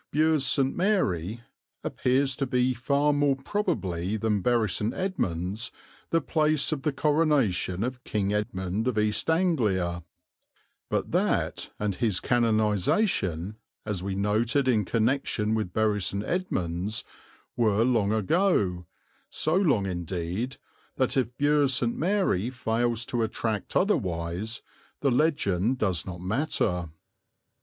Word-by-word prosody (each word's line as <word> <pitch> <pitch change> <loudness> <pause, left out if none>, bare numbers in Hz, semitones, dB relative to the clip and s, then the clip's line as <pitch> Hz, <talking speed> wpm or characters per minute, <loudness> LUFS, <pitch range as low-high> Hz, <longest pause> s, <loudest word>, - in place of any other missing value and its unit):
Bures 155 -1 +3
St. 135 0 +2
Mary 115 - 0 0.4
appears 130 +1 +1
to 135 - -1
be 125 0 +2
far 140 +5 +1
more 145 -1 +2
probably 110 - -2
than 105 -2 0
Bury 120 0 +2
St. 105 +4 -1
Edmunds 105 - -2 0.4
the 165 - +3
place 155 -1 +1
of 150 -3 -2
the 150 - 0
coronation 135 - +1
of 125 0 -4
King 100 -1 -1
Edmund 100 +1 -2
of 125 -4 0
East 105 +7 +1
Anglia; 105 - +1 0.9
but - - -1
that - - 0
and 105 -1 -1
his 105 -5 0
canonization, 110 - +1 0.3
as 105 -4 -2
we 95 0 -3
noted 110 +7 +1
in 110 -5 +3
connection 115 -1 0
with 110 -5 -1
Bury 105 0 +1
St. 100 +3 -1
Edmunds, 105 - -2 0.5
were 110 -2 +3
long 115 -5 +2
ago, 105 - +1 0.4
so 155 - -1
long 145 - +3
indeed, 90 - -3 0.4
that 130 +1 +1
if 125 -1 -1
Bures 145 -2 +3
St. 120 -2 0
Mary 170 - +1
fails 120 -2 -1
to 120 0 -2
attract 110 -1 -2
otherwise, 95 - -1 0.4
the 140 - +2
legend 125 - +1
does 95 -8 -1
not 90 -2 -6
matter. 90 - -1
115 Hz, 125 wpm, -27 LUFS, 100-140 Hz, 0.9 s, Bures